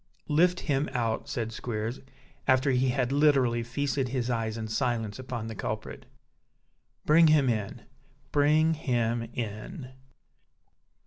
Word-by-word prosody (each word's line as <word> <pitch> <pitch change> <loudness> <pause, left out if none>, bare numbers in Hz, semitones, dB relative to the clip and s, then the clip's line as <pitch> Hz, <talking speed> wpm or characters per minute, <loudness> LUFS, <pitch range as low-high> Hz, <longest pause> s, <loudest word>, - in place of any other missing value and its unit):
"Lift 175 +4 +3
him 140 0 0
out," 115 -3 -1
said 115 -2 -3
Squeers, 115 +1 -4 0.5
after 130 +1 +4
he 130 0 +2
had 125 0 0
literally 135 -5 +3
feasted 135 +2 -2
his 125 -1 -1
eyes 115 -1 -2
in 110 -1 -4
silence 115 -2 -1
upon 125 -3 -5
the 110 - -5
culprit. - - -5 1.0
"Bring 160 +2 +6
him 150 -3 +4
in; 110 -5 -2 0.5
bring 155 +2 +4
him 120 -6 -1
in!" 125 - -6
125 Hz, 125 wpm, -28 LUFS, 115-145 Hz, 1.0 s, Bring